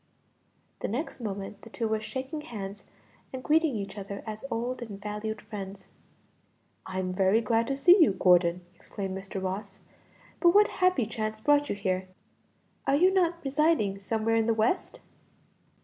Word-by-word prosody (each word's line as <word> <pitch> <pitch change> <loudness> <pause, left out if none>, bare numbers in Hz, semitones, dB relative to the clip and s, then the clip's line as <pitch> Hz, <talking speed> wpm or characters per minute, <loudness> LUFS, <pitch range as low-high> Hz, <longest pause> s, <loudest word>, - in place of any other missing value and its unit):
The - - -2
next 260 +9 -4
moment 200 -3 -5
the 225 - -12
two 225 0 -2
were 220 0 0
shaking 265 +7 -5
hands 205 -7 -7 0.5
and 260 -1 -6
greeting 310 -3 +3
each 200 0 -5
other 200 0 -7
as 215 -1 -6
old 245 +2 -2
and 210 -4 -7
valued 210 +1 -4
friends. 195 -2 -8 1.0
"I'm 185 -1 -2
very 190 +3 +3
glad 230 +1 +1
to 275 - -1
see 355 +6 +7
you, 305 - +6
Gordon!" 180 -1 +3
exclaimed 190 +1 -6
Mr. 195 0 -5
Ross; 195 +1 -5 0.6
"but 345 0 +5
what 415 +1 +6
happy 365 -10 +4
chance 215 0 -3
brought 290 +4 +3
you - - -1
here? 185 -2 -1 0.8
Are 275 - +4
you 365 +6 +4
not 345 -2 +1
residing 275 -8 +2
somewhere 220 +2 0
in 225 0 +2
the 230 - +2
West?" 225 - 0
220 Hz, 160 wpm, -28 LUFS, 195-270 Hz, 1.0 s, see